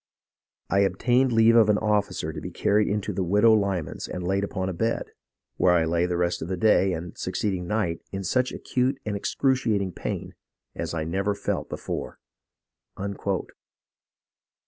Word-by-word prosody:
I 100 - +4
obtained 120 +7 +2
leave 115 0 +5
of 110 -2 +6
an 105 - +4
officer 105 -7 0
to 75 - -6
be - - -5
carried 105 +1 +2
into 105 0 -1
the 95 0 -1
widow 105 +5 +5
Lyman's 100 -6 -1
and 90 - -5
laid 95 +1 +1
upon 95 -2 -2
a 95 - -2
bed, 115 +7 -1 0.5
where 90 - +4
I 85 -2 +3
lay 85 +2 +1
the 90 -1 -1
rest 90 0 0
of 80 - -4
the 95 0 -2
day 95 0 +4
and 85 0 -5
succeeding 95 -4 -2
night 90 -5 -1
in 95 0 -4
such 125 +7 +1
acute 130 +2 -1
and 105 -1 -2
excruciating 110 -3 0
pain - - -5 0.4
as - - -4
I 80 - -1
never 95 +5 -1
felt - - -3
before." - - -5
100 Hz, 165 wpm, -26 LUFS, 90-110 Hz, 0.5 s, of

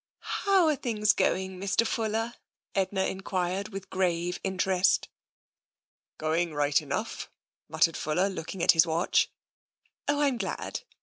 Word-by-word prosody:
"How 390 -3 +5
are 305 - +3
things 215 -5 +1
going, 190 0 0
Mr. 200 +4 +1
Fuller?" 225 +1 -1 0.4
Edna 190 0 0
en 190 - -3
quired 185 +1 -2
with 195 -2 -8
grave 180 -2 0
interest. 190 -1 +2 0.5
" - - -70 0.3
Going 160 +1 0
right 145 0 +2
enough," 150 +10 -4 0.4
muttered 165 - +2
Fuller, 175 +6 +1
looking 185 -1 -5
at - - +8
his 165 0 +4
watch. 165 +2 +2 0.4
" - - -45
Oh, 290 0 +2
I'm 275 -5 +2
glad. 195 - -4
190 Hz, 140 wpm, -28 LUFS, 170-210 Hz, 0.5 s, at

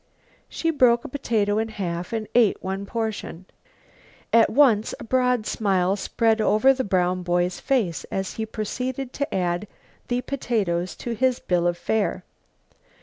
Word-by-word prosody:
She 330 - -1
broke 245 -5 +3
a - - -6
potato 215 -6 0
in 220 - -1
half 180 -5 -4
and 220 -2 -3
ate 235 -4 +3
one 195 +1 -4
portion. 220 -6 -4 0.9
At 230 0 +6
once 230 -5 +3
a - - -7
broad 250 -1 +1
smile 195 -4 +1
spread 220 +2 +1
over 215 +6 +4
the 260 0 -2
brown 185 -2 +1
boy's 175 0 0
face 225 - 0
as 190 -1 -4
he 220 0 -4
proceeded 250 +4 -4
to 285 - -3
add 180 +2 -1 0.4
the 245 0 0
potatoes 195 -11 -2
to 240 - -5
his 250 +2 +1
bill 175 -1 +1
of 175 0 0
fare. 215 +4 -1
215 Hz, 150 wpm, -24 LUFS, 185-245 Hz, 0.9 s, At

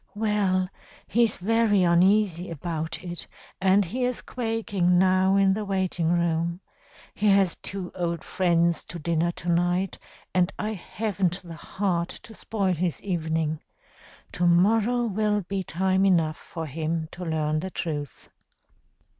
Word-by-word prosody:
'Well, 205 -4 +1 0.4
he's 230 0 +2
very 210 0 +2
uneasy 180 +1 +3
about 160 0 -4
it, 175 -1 -7 0.3
and 190 +1 +4
he 250 +9 -3
is 250 0 -1
quaking 215 -7 0
now 185 +1 +4
in 195 -1 +4
the 215 +2 -2
waiting 185 -4 0
room. 170 0 0 0.5
He 210 - 0
has 195 -3 +4
two 190 -2 -5
old 170 -2 -2
friends 170 -2 +1
to 170 - -8
dinner 170 +1 0
to 175 - -6
night, 175 +2 +1 0.3
and 180 +1 +2
I 215 0 -2
haven't 195 -2 -2
the 170 -1 -9
heart 175 0 -2
to 225 - -12
spoil 200 -3 -1
his 175 0 -1
evening. 160 -4 -1 0.7
To 175 - +1
morrow 220 +7 +3
will 210 -1 +1
be 195 +1 -3
time 190 +2 +1
enough 165 -5 +2
for 165 -2 -7
him 160 +2 -2
to 180 - -8
learn 155 -2 0
the 190 - -4
truth.' 150 -7 -5
180 Hz, 140 wpm, -26 LUFS, 170-200 Hz, 0.7 s, and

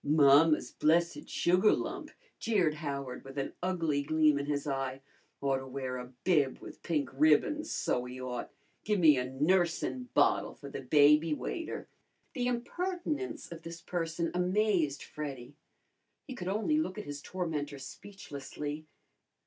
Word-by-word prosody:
"Mamma's 150 +1 +5
blessed 170 +2 +1
sugar 180 +4 +4
lump!" 325 -1 -3 0.3
jeered 195 -9 +2
Howard, 140 -4 -5
with 135 +1 -11
an 135 - -2
ugly 165 -6 0
gleam 155 0 +3
in 140 - -4
his 145 -1 -1
eye. 135 -2 -2 0.4
"Ought 135 -1 +1
to 130 0 -7
wear 130 -1 -4
a 125 0 -8
bib 150 -8 +3
with - - -11
pink 150 -6 -1
ribbons, 155 - +3
so 125 - 0
he 125 +1 -8
ought. 125 -2 -5 0.3
Gimme 180 -8 +5
a 125 - 0
nursin' 175 - 0
bottle - - +3
for 140 -1 -10
the - - -5
baby, 150 +3 +5
waiter!" 330 - -5 0.5
The 245 -2 -1
impertinence 320 - -3
of 170 -1 -8
this 165 0 -8
person 165 -1 -2
amazed 180 -4 +1
Freddy. 140 -4 -7 0.7
He 265 - -5
could 180 -8 -6
only 220 +11 +1
look 215 -10 -2
at 210 - -5
his 145 0 -6
tormentor 150 -6 -3
speechlessly. 150 -2 -7
155 Hz, 145 wpm, -31 LUFS, 140-185 Hz, 0.7 s, Mamma's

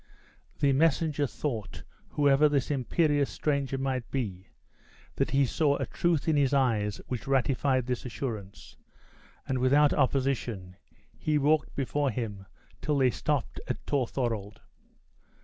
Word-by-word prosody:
The 140 -2 +3
messenger 150 0 +2
thought, 120 -7 -5 0.3
whoever 145 +1 +4
this 145 -1 0
imperious 145 +1 +1
stranger 140 -3 -1
might 130 -2 -2
be, 95 -8 -4 0.7
that - - +1
he 140 0 +3
saw 145 +2 +1
a 135 - -2
truth 170 +5 0
in 160 - +3
his 140 -1 +3
eyes 110 -7 +1
which 125 -1 -5
ratified 135 -1 +1
this 125 -1 -3
assurance; 110 -6 -6 0.7
and 130 -1 0
without 140 +3 +4
opposition, 125 -9 0 0.4
he 155 -1 +1
walked 150 +1 +2
before 140 +1 0
him 105 -5 -5 0.3
till 150 -2 0
they 130 -2 +4
stopped 95 - -2
at - - -2
Torthorald. 115 -6 -2
135 Hz, 130 wpm, -28 LUFS, 120-145 Hz, 0.7 s, whoever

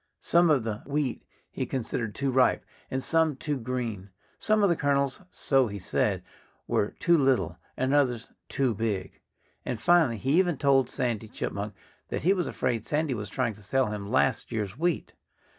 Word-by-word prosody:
Some 170 0 +4
of 140 -6 +3
the 110 -2 -3
wheat 140 -3 -1 0.3
he - - -3
considered 115 -3 -3
too 135 0 0
ripe, 130 0 +3 0.2
and 130 0 -2
some 160 -3 +2
too 145 +2 -2
green. 115 -5 -4 0.3
Some 215 -1 +2
of 200 - +5
the 170 - +3
kernels 140 -1 0
so 135 -7 +2
he 100 -1 -5
said 95 - 0 0.4
were 105 - 0
too 170 -1 +4
little, 135 -5 +2 0.2
and 130 +2 +1
others 125 -5 +1 0.2
too 130 -4 +1
big. 105 -3 -3 0.4
And - - -3
finally 165 -10 +4
he 135 - +2
even 175 -5 +2
told 135 -2 +3
Sandy 115 -3 -2
Chipmunk 100 -1 -4 0.3
that - - -3
he 185 +4 +5
was 180 -4 -1
afraid 120 -4 -1
Sandy 150 0 0
was 105 -3 -5
trying 120 0 -1
to 105 - -16
sell 120 +3 0
him 100 -1 -5
last 130 0 +1
year's 105 -3 -3
wheat. 170 +3 -1
130 Hz, 175 wpm, -28 LUFS, 110-145 Hz, 0.4 s, of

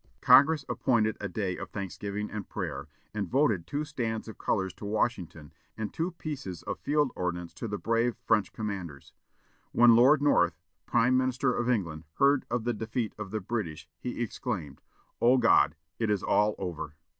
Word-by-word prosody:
Congress 145 0 +6
appointed 110 -4 +1
a 105 - -3
day 95 -1 -2
of - - -7
thanksgiving 100 +1 -5
and 105 -2 -6
prayer, - - -4 0.3
and 100 -4 -3
voted 120 - +2
two 145 +1 -2
stands 115 -7 -3
of 110 - -9
colors 95 -3 -1
to - - -14
Washington 100 -8 -2 0.2
and 110 -1 -4
two 165 +2 -1
pieces 135 - -6
of - - -4
field 145 -2 +1
ordnance 90 -1 -3
to 115 - -5
the 105 -1 -3
brave 115 +2 +1
French 105 -4 +2
commanders. 95 -10 -6 0.6
When 120 -1 +7
Lord 135 +6 +6
North, 90 - +3 0.3
Prime 125 +1 +3
Minister 130 0 +1
of 120 0 -1
England, 85 -9 -1
heard 140 0 +3
of 120 -1 -1
the 120 +1 0
defeat 110 +1 -3
of 105 -2 -5
the 110 +2 -3
British, 90 -8 -4
he 120 -1 -3
exclaimed, 95 - -5 0.4
"Oh, 125 +3 +5
God! 75 - +4 0.2
it 115 -2 0
is 105 -3 0
all 105 0 +2
over!" 80 -5 -5
110 Hz, 170 wpm, -29 LUFS, 95-125 Hz, 0.6 s, When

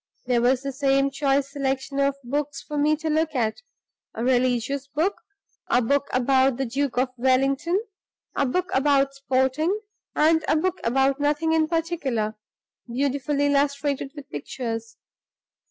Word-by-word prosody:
There 245 -1 +2
was 250 +2 +2
the 275 - -2
same 275 0 +2
choice 275 0 +1
selection 275 0 -2
of 280 0 +2
books 280 +3 -2
for 300 - -7
me 295 +1 +3
to 315 +1 -5
look 315 0 0
at 225 - 0 0.5
a 225 - -3
religious 255 +2 +1
book, 315 +8 -1 0.5
a 245 - +3
book 280 +4 +1
about 260 0 +3
the 270 - -1
Duke 270 +1 -2
of 255 +1 +2
Wellington, 270 +8 +2 0.6
a 280 - +1
book 365 +7 -1
about 275 0 +3
sporting, 275 +7 0 0.4
and 320 +1 +4
a - - +3
book 365 +3 0
about 270 +3 +2
nothing 300 +3 +1
in 320 -1 +3
particular, 310 -10 -1 0.6
beautifully 280 +2 0
illustrated 280 -1 0
with 290 -2 -9
pictures. 225 - -5
275 Hz, 145 wpm, -24 LUFS, 260-295 Hz, 0.6 s, and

